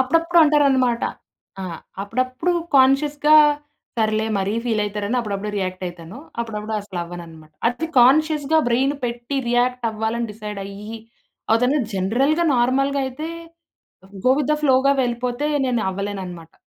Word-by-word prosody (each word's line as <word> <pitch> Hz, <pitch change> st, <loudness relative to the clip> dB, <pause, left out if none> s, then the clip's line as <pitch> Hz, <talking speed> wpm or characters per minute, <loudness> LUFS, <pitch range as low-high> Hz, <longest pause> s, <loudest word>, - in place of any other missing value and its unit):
అప్పుడప్పుడు 330 Hz, +6 st, +2 dB
అంటారనమాట. 270 Hz, -5 st, +3 dB, 0.6 s
ఆ! -, -, -4 dB, 0.4 s
అప్పుడప్పుడు 255 Hz, -, -1 dB, 0.2 s
కాన్షియస్‌గా 290 Hz, +3 st, +4 dB, 0.6 s
సర్లే, 215 Hz, 0 st, +1 dB
మరీ 195 Hz, +2 st, -1 dB
ఫీలయితారని 210 Hz, 0 st, -1 dB
అప్పుడప్పుడు 210 Hz, -1 st, -4 dB
రియాక్టయితాను. 185 Hz, 0 st, -5 dB, 0.2 s
అప్పుడప్పుడు 220 Hz, -1 st, -4 dB
అస్సలవ్వననమాట. 170 Hz, -5 st, -8 dB, 0.2 s
అది 250 Hz, +7 st, -3 dB
కాన్షియస్‌గా 305 Hz, +4 st, +4 dB
బ్రైను 265 Hz, +4 st, +1 dB
పెట్టి, 240 Hz, +3 st, -3 dB
రియాక్టవ్వాలని 235 Hz, -2 st, 0 dB
డిసైడయ్యి 210 Hz, +1 st, -7 dB, 0.5 s
ఆహ్, 225 Hz, -, +5 dB
తను 275 Hz, +4 st, +3 dB, 0.2 s
జనరల్‌గా, 260 Hz, -, +1 dB
నార్మల్‌గయితే, 270 Hz, +3 st, 0 dB, 1.0 s
గో -, -, +6 dB
విత్ 295 Hz, 0 st, 0 dB
ద 300 Hz, -, +2 dB
ఫ్లోగా 270 Hz, 0 st, +4 dB
వెళ్ళిపోతే, 245 Hz, +3 st, -2 dB, 0.2 s
నేనవ్వలేననమాట. 190 Hz, -7 st, -4 dB
240 Hz, 100 wpm, -21 LUFS, 205-275 Hz, 1.0 s, గో